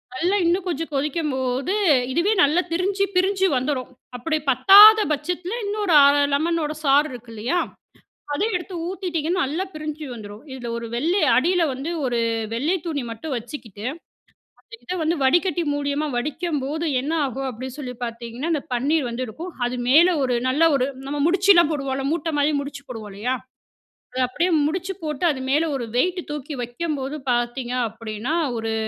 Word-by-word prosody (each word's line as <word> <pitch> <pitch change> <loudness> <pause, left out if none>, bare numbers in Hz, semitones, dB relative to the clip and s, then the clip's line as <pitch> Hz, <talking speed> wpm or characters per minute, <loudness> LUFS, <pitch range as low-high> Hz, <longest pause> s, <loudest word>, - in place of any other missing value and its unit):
நல்லா 360 +9 +1
இன்னும் 360 +2 +1
கொஞ்சம் 330 -1 -3
கொதிக்கும்போது 275 +1 -1 0.4
இதுவே 345 +8 +2
நல்லா 310 +5 +3
பிரிஞ்சி 385 +3 0
பிரிஞ்சு 385 +1 +2
வந்துரும். 255 -1 -2 0.3
அப்டி 310 +5 -1
பத்தாத 405 - +9
பட்சத்தில 355 +9 -2
இன்னொரு 410 -4 0
1/2 280 - +6 0.2
லெமன்னோட 315 0 0
சாறு 285 +3 +4
இருக்கு 240 -1 -10
இல்லையா 245 +12 0 0.7
அத 285 - -2
எடுத்து 360 +1 -4
ஊத்திட்டீங்கன்னா 360 -2 -2
நல்லா 305 +7 -2
பிரிஞ்சு 305 0 -5
வந்துரூம் 210 -2 -9
இதில 245 -3 -6
ஒரு 235 - -5
வெள்ளை 335 +10 +1 0.2
அடியில 345 +7 +3
வந்து 270 +5 -5 0.2
ஒரு 240 -2 0 0.4
வெள்ளை 290 +10 0
துணி 305 -4 -2
மட்டும் 265 +6 -5
வச்சுக்கிட்டு. 225 -3 -7 0.8
அந்த - - -22
இத 360 - -4
வந்து 320 +2 +1
வடிக்கட்டி 345 +4 +2
மூலியமா 290 +1 -1
வடிக்கம்போது 300 +2 -2 0.2
என்ன 290 +4 -3
ஆகும் 270 +1 -4
அப்டின்னு 255 +2 -7
சொல்லி 250 -3 -5
பார்த்தீங்கன்னா, 235 +5 -5
அந்த 300 - 0
பன்னீர் 275 +2 +1
வந்து 245 +2 -3
இருக்கும் 330 - -8
அது 250 - -4
மேல 320 +7 +7 0.2
ஒரு 250 -2 +1
நல்ல 295 +5 +2
ஒரு 260 -1 +1 0.2
நம்ம 290 +1 -3
முடிச்சலாம் 360 -2 +5
போடுவோம்ல்ல 270 -2 -2
மூட்ட 330 -1 -1
மாரி 290 +1 +3
முடிச்சு 280 0 -7
போடுவோம் 220 -4 -7
இல்லையா, 240 +6 -1 0.8
அத 255 - -3
அப்டியே 335 +8 0 0.2
முடிச்சு 370 +4 -3
போட்டு 305 +1 -2
அது 260 - -5
மேல 315 +3 +2
ஒரு 245 -3 -3
வெய்ட் 360 +6 +1
தூக்கி 295 0 -5
வைக்கும்போது 275 +2 -4 0.2
பார்த்தீங்க 240 +1 -1 0.2
அப்டின்னா 225 +4 -5 0.2
ஒரு 225 0 -2
290 Hz, 155 wpm, -23 LUFS, 255-340 Hz, 0.8 s, பத்தாத